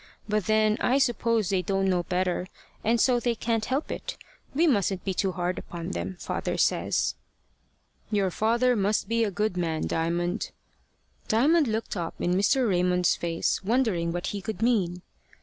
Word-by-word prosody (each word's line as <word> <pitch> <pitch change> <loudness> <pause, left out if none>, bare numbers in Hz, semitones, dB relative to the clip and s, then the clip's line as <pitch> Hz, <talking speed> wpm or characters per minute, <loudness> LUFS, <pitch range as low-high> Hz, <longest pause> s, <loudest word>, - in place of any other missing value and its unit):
But 210 -2 0
then 215 0 +3
I 255 - +2
suppose 230 -5 +1
they 190 -2 +1
don't 195 0 0
know 180 -2 +2
better, 180 0 -1 0.4
and 230 +2 +2
so 245 +1 +4
they 240 -1 0
can't 225 -1 -1
help 270 +4 -2
it. - - -5 0.4
We 325 +4 +4
mustn't 200 - +1
be 190 - 0
too 190 +1 0
hard 180 0 -2
upon 170 -1 -6
them, 85 +2 -4
father - - -3
says." - - +1 1.0
"Your 200 -3 +1
father 235 +5 +2
must 205 0 +1
be 230 0 +1
a 215 - +1
good 205 0 -1
man, 165 -3 -1
Diamond." 175 +4 -1 0.8
Diamond 290 +7 +4
looked 220 0 -2
up 170 -3 -4
in 175 - +1
Mr. 230 +7 +3
Raymond's 180 -2 +2
face, 170 +2 -1
wondering 205 -7 +1
what 175 +1 -3
he 200 +1 -3
could 220 +1 -4
mean. 185 -7 +1
200 Hz, 165 wpm, -27 LUFS, 180-230 Hz, 1.0 s, so